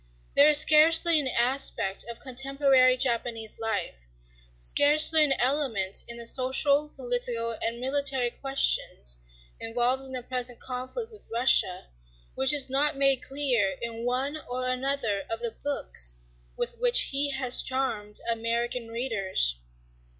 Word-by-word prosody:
There 285 Hz, +2 st, +6 dB
is 300 Hz, -, +5 dB
scarcely 320 Hz, +2 st, +5 dB
an 280 Hz, -, -1 dB
aspect 240 Hz, -6 st, -1 dB
of 235 Hz, -, -8 dB
contemporary 265 Hz, -1 st, +2 dB
Japanese 235 Hz, -3 st, -3 dB
life, 225 Hz, -, -4 dB, 0.6 s
scarcely 300 Hz, -, +5 dB
an 285 Hz, -2 st, +3 dB
element 250 Hz, -8 st, -1 dB
in 235 Hz, -, -6 dB
the 235 Hz, -, -8 dB
social, 280 Hz, +4 st, +1 dB
political, 245 Hz, -2 st, -1 dB
and 230 Hz, +1 st, -2 dB
military 265 Hz, -1 st, +1 dB
questions 235 Hz, -, 0 dB, 0.4 s
involved 240 Hz, +3 st, -2 dB
in 265 Hz, -, -12 dB
the 255 Hz, -1 st, -3 dB
present 250 Hz, -1 st, -4 dB
conflict 260 Hz, -, -6 dB
with 430 Hz, -, -17 dB
Russia 230 Hz, -6 st, +2 dB, 0.5 s
which 265 Hz, 0 st, +2 dB
is 290 Hz, -3 st, +2 dB
not 275 Hz, +2 st, 0 dB
made 275 Hz, -1 st, +2 dB
clear 245 Hz, -9 st, -1 dB
in 230 Hz, 0 st, -6 dB
one 265 Hz, +5 st, -2 dB
or 255 Hz, +1 st, -4 dB
another 255 Hz, -6 st, -2 dB
of 225 Hz, -, -4 dB
the 235 Hz, -1 st, -5 dB
books 60 Hz, -, 0 dB, 0.4 s
with 475 Hz, -, -5 dB
which -, -, +4 dB
he 280 Hz, +1 st, 0 dB
has 265 Hz, -2 st, +1 dB
charmed 230 Hz, -6 st, -3 dB
American 235 Hz, +1 st, -2 dB
readers. 200 Hz, -, -1 dB
255 Hz, 135 wpm, -26 LUFS, 230-275 Hz, 0.6 s, There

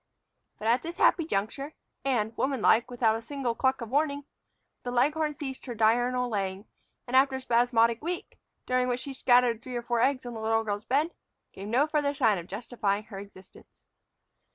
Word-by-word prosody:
But 215 Hz, -, -4 dB
at 240 Hz, +3 st, +3 dB
this 335 Hz, +1 st, -7 dB
happy 330 Hz, -, +4 dB
juncture, 275 Hz, +7 st, -3 dB, 0.3 s
and, 230 Hz, -5 st, 0 dB
womanlike, 240 Hz, -3 st, +2 dB
without 235 Hz, -3 st, +2 dB
a -, -, -8 dB
single 255 Hz, 0 st, -3 dB
cluck 260 Hz, +2 st, 0 dB
of 230 Hz, -1 st, -6 dB
warning, 285 Hz, 0 st, 0 dB, 0.6 s
the 245 Hz, -, -5 dB
leghorn 295 Hz, +5 st, +1 dB
ceased 270 Hz, -2 st, -6 dB
her 240 Hz, -, -5 dB
diurnal 245 Hz, +3 st, +2 dB
laying, 195 Hz, -2 st, -3 dB, 0.4 s
and, 255 Hz, -, -3 dB
after 265 Hz, 0 st, +5 dB
a -, -, -3 dB
spasmodic 235 Hz, -2 st, +2 dB
week, 345 Hz, +3 st, -5 dB, 0.3 s
during 255 Hz, 0 st, +1 dB
which 250 Hz, 0 st, -1 dB
she 275 Hz, -, -5 dB
scattered 245 Hz, -3 st, +3 dB
three 250 Hz, 0 st, -7 dB
or 240 Hz, -, -3 dB
four 240 Hz, -1 st, 0 dB
eggs 265 Hz, 0 st, +1 dB
on 240 Hz, -, -6 dB
the 220 Hz, -, -6 dB
little 225 Hz, 0 st, +1 dB
girl's 205 Hz, -1 st, -3 dB
bed, 295 Hz, +6 st, +1 dB, 0.4 s
gave 195 Hz, +1 st, -8 dB
no 250 Hz, +7 st, +3 dB
further 295 Hz, -2 st, 0 dB
sign 215 Hz, -7 st, +3 dB
of 170 Hz, -, -9 dB
justifying 210 Hz, -1 st, -2 dB
her 210 Hz, -3 st, -9 dB
existence. 195 Hz, -1 st, -15 dB
245 Hz, 185 wpm, -28 LUFS, 225-270 Hz, 0.6 s, after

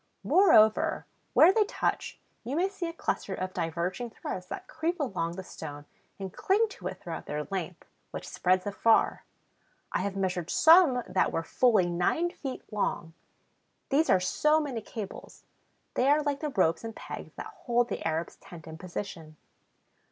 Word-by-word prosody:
Moreover, 245 Hz, -, +4 dB, 0.3 s
where 355 Hz, +4 st, +7 dB
they 440 Hz, -, +4 dB
touch, -, -, -2 dB, 0.2 s
you 250 Hz, +5 st, -3 dB
may 365 Hz, +4 st, +2 dB
see 390 Hz, -3 st, -4 dB
a -, -, -7 dB
cluster 200 Hz, -, -2 dB
of 185 Hz, 0 st, -4 dB
diverging 175 Hz, +8 st, -2 dB
threads 180 Hz, -4 st, -6 dB
that -, -, -7 dB
creep 330 Hz, +2 st, -2 dB
along 180 Hz, -, -2 dB
the 190 Hz, -, -6 dB
stone 145 Hz, -4 st, -8 dB, 0.3 s
and 190 Hz, -2 st, -6 dB
cling 425 Hz, +4 st, +2 dB
to -, -, -7 dB
it -, -, -6 dB
throughout 165 Hz, -2 st, -7 dB
their 150 Hz, 0 st, -2 dB
length, 180 Hz, -2 st, -4 dB, 0.2 s
which -, -, -7 dB
spreads 185 Hz, 0 st, +1 dB
afar. 220 Hz, +2 st, +2 dB, 0.7 s
I -, -, 0 dB
have 200 Hz, -1 st, -2 dB
measured 180 Hz, -3 st, -2 dB
some 320 Hz, -7 st, +6 dB
that -, -, +1 dB
were 165 Hz, -, -1 dB
fully 215 Hz, 0 st, +3 dB
nine 180 Hz, -, +1 dB
feet 270 Hz, -6 st, -6 dB
long. 170 Hz, -5 st, -2 dB, 0.8 s
These 305 Hz, +4 st, +2 dB
are -, -, +5 dB
so 300 Hz, +12 st, +2 dB
many 270 Hz, -7 st, -3 dB
cables; 210 Hz, -2 st, -8 dB, 0.5 s
they 255 Hz, +2 st, +2 dB
are 300 Hz, +1 st, +4 dB
like 285 Hz, -1 st, -1 dB
the 300 Hz, -, -2 dB
ropes 170 Hz, -, +1 dB
and 225 Hz, -1 st, -6 dB
pegs -, -, -8 dB
that 435 Hz, -, -8 dB
hold 240 Hz, -1 st, +2 dB
the -, -, -3 dB
Arab's 160 Hz, +1 st, -2 dB
tent 165 Hz, -3 st, -13 dB
in 160 Hz, 0 st, -9 dB
position. 165 Hz, -4 st, -7 dB
210 Hz, 165 wpm, -29 LUFS, 175-295 Hz, 0.8 s, where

